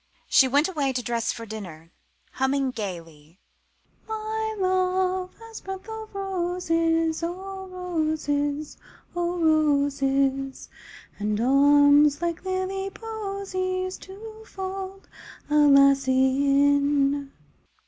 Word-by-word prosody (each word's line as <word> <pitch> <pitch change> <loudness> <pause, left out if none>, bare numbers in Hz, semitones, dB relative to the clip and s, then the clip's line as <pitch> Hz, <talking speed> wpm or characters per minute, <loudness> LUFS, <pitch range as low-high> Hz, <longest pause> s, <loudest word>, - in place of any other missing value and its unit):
She 265 - +5
went 285 +4 +3
away 290 -8 -1
to 250 -1 -2
dress 235 -1 -1
for 230 - -7
dinner, 175 -7 -9 0.4
humming 265 0 0
gaily 165 -7 -8 0.7
"My 440 0 -3
love 370 0 0
has 455 0 -11
breath 385 +1 -7
o' 440 -1 -7
roses, 345 -4 0
O' 380 +3 -5
roses, 310 -5 -2 0.4
o' 350 0 -1
roses; 280 -4 +1 0.5
And 210 0 -1
arms 285 +3 +5
like 340 -1 -3
lily 380 +1 -2
posies 390 -4 -4
To 435 +3 -11
fold 385 -1 -7 0.4
a 300 0 +5
lassie 275 -1 +4
in!" 280 0 +2
315 Hz, 95 wpm, -25 LUFS, 275-375 Hz, 0.7 s, She